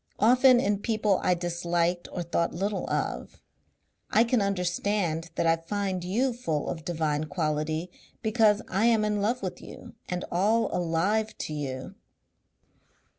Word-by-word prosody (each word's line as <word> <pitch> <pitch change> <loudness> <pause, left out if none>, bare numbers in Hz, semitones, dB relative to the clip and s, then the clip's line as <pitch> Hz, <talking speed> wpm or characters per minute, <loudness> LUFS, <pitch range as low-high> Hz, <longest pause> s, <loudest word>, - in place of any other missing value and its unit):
Often 250 +3 +6
in 205 -5 +1
people 215 -3 +1
I 180 - +2
disliked 175 0 -1
or 175 - -3
thought 170 0 -1
little 200 +3 -2
of.... - - -3 0.7
I 220 - +5
can 235 -1 +1
understand 180 -3 -1
that - - 0
I 165 0 +4
find 190 +1 -3
you 240 +8 0
full 160 -11 -2
of 160 - -5
divine 155 -3 -1
quality, 155 +1 -2 0.3
because 220 -1 +3
I 205 +5 +2
am 225 -2 +3
in 210 -1 0
love 235 +5 0
with - - -4
you - - -11 0.2
and 180 0 -3
all 215 +6 +2
alive 185 +6 0
to 155 - -4
you. 140 +2 -5
185 Hz, 145 wpm, -27 LUFS, 165-215 Hz, 0.7 s, Often